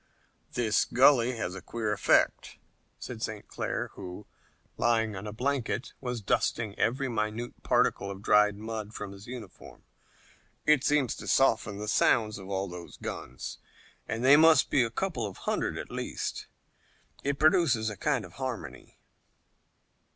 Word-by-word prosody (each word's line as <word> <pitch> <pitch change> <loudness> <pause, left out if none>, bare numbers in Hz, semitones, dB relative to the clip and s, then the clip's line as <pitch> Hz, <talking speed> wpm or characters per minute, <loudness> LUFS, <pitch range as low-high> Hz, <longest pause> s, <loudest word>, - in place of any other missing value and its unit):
"This 115 -4 +2
gully 125 -1 +5
has 90 - -3
a 95 - -7
queer 110 0 -2
effect," 105 - +2 0.4
said 120 -3 -8
St. 110 -2 -4
Clair, - - -3
who, 90 +3 -8 0.5
lying 110 -2 +1
on 95 +3 -6
a - - -4
blanket, 125 +1 -2
was 125 -3 -3
dusting 105 +2 0
every 135 +4 +1
minute 115 0 -3
particle 100 - +1
of 100 0 -8
dried 105 -1 +4
mud 110 0 -6
from 105 -1 -5
his 100 +1 -12
uniform. 120 -6 -10 0.8
"It 150 -3 +4
seems 145 -4 +2
to - - -8
soften 110 -6 +2
the 105 +1 -5
sounds 110 -1 +2
of 95 0 -10
all 95 0 -1
those 90 -1 -9
guns 65 +1 -6 0.5
and 115 +3 -2
they 140 +2 +8
must 160 0 +6
be 135 - +4
a 115 - +1
couple 120 - -2
of 95 - -9
hundred - - -1
at - - -7
least. - - -4 0.8
It 140 0 0
produces 155 - +3
a - - -6
kind 135 -6 0
of 90 - -14
harmony." 130 -4 -6
110 Hz, 150 wpm, -29 LUFS, 105-130 Hz, 0.8 s, they